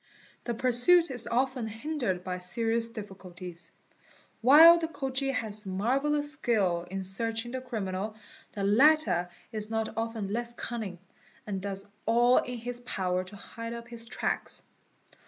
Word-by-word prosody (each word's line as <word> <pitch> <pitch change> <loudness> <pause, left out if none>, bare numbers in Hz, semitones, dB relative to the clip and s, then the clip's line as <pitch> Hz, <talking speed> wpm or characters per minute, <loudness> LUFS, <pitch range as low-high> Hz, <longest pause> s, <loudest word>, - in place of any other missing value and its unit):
The 235 - -2
pursuit 260 +8 +4
is 245 -3 0
often 255 -1 0
hindered 225 - -3
by 180 0 -4
serious 230 +4 0
difficulties. 185 -5 -9 0.7
While 320 +8 +9
the 325 - -2
Khoji 270 -3 -3
has 215 -5 -4
marvellous 275 +10 +1
skill 190 - 0
in 190 +1 -4 0.2
reaching 225 +1 -2
the 260 0 -4
criminal, 215 -4 -4 0.4
the 200 - -4
latter 210 - +4 0.2
is 215 -1 -3
not 225 0 -2
often 225 -3 -3
less 235 +1 -3
cunning, 220 -8 -5 0.5
and 195 -3 -4
does 195 0 -3 0.2
all 240 +2 +5
in 250 -1 -4
his 245 +1 -5
power 185 -6 -1
to 195 +2 -12
hide 230 +3 -7
up 235 0 -8
his 230 -1 -1
tracks. - - -2
230 Hz, 140 wpm, -29 LUFS, 200-250 Hz, 0.7 s, While